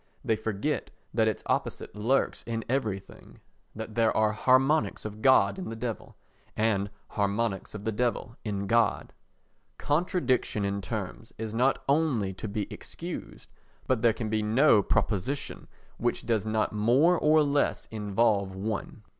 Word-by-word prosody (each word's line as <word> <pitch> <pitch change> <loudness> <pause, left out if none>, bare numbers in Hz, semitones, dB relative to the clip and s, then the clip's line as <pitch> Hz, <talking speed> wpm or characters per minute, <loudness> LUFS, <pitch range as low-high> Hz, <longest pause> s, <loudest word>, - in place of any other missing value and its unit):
They 110 - +2
forget 110 +8 -2 0.2
that 110 -1 +3
its 110 - -1
opposite - - -2
lurks 115 +6 +1
in 115 -1 -3
everything—that 110 -1 -5
there 115 -1 +2
are 110 -1 +3
harmonics 130 +8 +2
of 110 0 -6
God 130 +8 +4
in 185 - -5
the 115 - -5
Devil 115 0 -5 0.4
and 105 -2 +1 0.2
harmonics 100 0 -1
of 105 0 -7
the 110 - +1
Devil 120 +1 -1
in 100 -2 -2
God. 115 +3 +1 0.6
Contradiction 145 - 0
in 100 0 -1
terms 110 +2 -5
is 110 -1 -5
not 125 +4 +2
only 135 -10 +1
to 95 - -6
be 105 0 -2
excused - - -8 0.3
but 130 -4 +1
there 115 - +5
can 110 0 -4
be 110 0 0
no 110 +2 +5
proposition 105 +7 -1 0.3
which - - -1
does 110 -2 0
not 110 0 0
more 125 +12 +4
or 155 0 +5
less 145 0 +1
involve 105 -2 +1
one. 105 +2 -4
110 Hz, 145 wpm, -28 LUFS, 105-130 Hz, 0.6 s, there